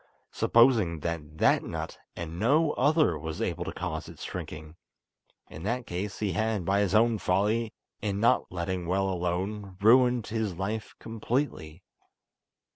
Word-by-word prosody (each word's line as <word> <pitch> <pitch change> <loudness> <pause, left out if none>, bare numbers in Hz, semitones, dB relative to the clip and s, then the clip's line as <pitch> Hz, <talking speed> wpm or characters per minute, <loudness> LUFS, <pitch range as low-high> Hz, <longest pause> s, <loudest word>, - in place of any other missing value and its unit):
Supposing 115 - +3
that 80 -2 -4
that - - +4
nut - - -6 0.2
and 85 0 -6
no 150 - +3
other 150 - +2
was 80 +1 -5
able - - -2
to - - -4
cause - - -5
its - - -10
shrinking! 75 0 -7 0.7
In 80 - -10
that 120 +6 -2
case 95 +3 -4
he 105 -3 -1
had, 110 0 -1
by 100 +3 +2
his 100 0 +1
own 115 0 +4
folly, 105 +5 +1 0.3
in 100 -2 -2
not 115 - +2
letting 90 0 -3
well 95 +2 +1
alone, 95 +2 -3
ruined 120 +2 +5
his 110 -4 -2
life 105 +5 -4
completely. 110 - -3
100 Hz, 145 wpm, -28 LUFS, 85-115 Hz, 0.7 s, ruined